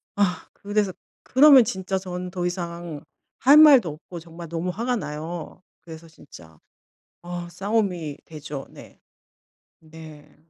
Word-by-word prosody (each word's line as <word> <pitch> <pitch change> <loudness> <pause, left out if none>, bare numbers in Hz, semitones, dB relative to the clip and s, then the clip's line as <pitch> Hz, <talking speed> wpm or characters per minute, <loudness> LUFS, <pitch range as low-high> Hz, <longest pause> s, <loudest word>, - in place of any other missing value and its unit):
아 195 -3 0
그래서 205 -1 -2 0.3
그러면 275 -1 +7
진짜 190 -2 -3
저는 180 -1 -6
더 180 -1 -3
이상 170 -3 -5 0.4
할 275 +5 +6
말도 275 - +7
없고 165 +3 -10
정말 165 +1 -11
너무 170 +2 -3
화가 235 +7 -2
나요. 160 -1 -7 0.2
그래서 165 0 -12
진짜 85 - -16 0.6
어 175 0 -6
싸움이 180 -5 -2
되죠. 150 -3 -8
네. - - -15 0.8
네. 155 -2 -14
175 Hz, 230 characters per minute, -24 LUFS, 160-200 Hz, 0.8 s, 그러면